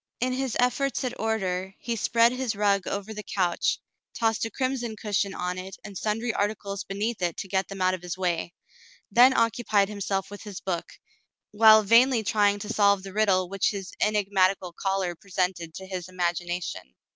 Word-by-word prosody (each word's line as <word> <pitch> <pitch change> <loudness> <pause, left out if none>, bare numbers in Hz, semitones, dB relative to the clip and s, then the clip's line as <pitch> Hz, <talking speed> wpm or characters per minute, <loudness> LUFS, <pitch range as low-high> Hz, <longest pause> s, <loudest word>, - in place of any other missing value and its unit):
In 255 +1 0
his 260 -2 -2
efforts 255 +3 +1
at 250 -1 -4
order, 190 -4 -2
he 235 -1 -3
spread 230 +2 +3
his 255 -3 -2
rug 200 -2 +1
over 200 +2 -4
the 210 - -6
couch, 180 -4 0 0.4
tossed 225 -2 +1
a - - -3
crimson 255 -3 -2
cushion 200 -2 -1
on 180 +1 -3
it 190 +1 -8
and 205 -2 -9
sundry 225 +4 -1
articles 200 -1 -2
beneath 205 +2 -3
it 175 -2 -1
to - - -5
get 190 0 0
them 195 -1 -7
out 185 0 +3
of 185 - -4
his 180 0 -5
way, 175 -2 -2 0.6
then 250 +2 +7
occupied 215 -3 +2
himself 200 -1 -3
with 205 - -8
his 205 -3 -7
book, 175 -3 -4 0.6
while 220 0 +7
vainly 230 +2 +5
trying 205 -1 +2
to 205 +1 -5
solve 200 -2 +3
the 195 -1 -8
riddle 195 -4 +2
which 195 +1 0
his 195 -2 -6
enigmatical 195 -3 +1
caller 190 -1 -1
presented 180 -3 -3
to 190 - -7
his 185 -2 -6
imagination. 175 - -3
200 Hz, 180 wpm, -26 LUFS, 185-220 Hz, 0.6 s, then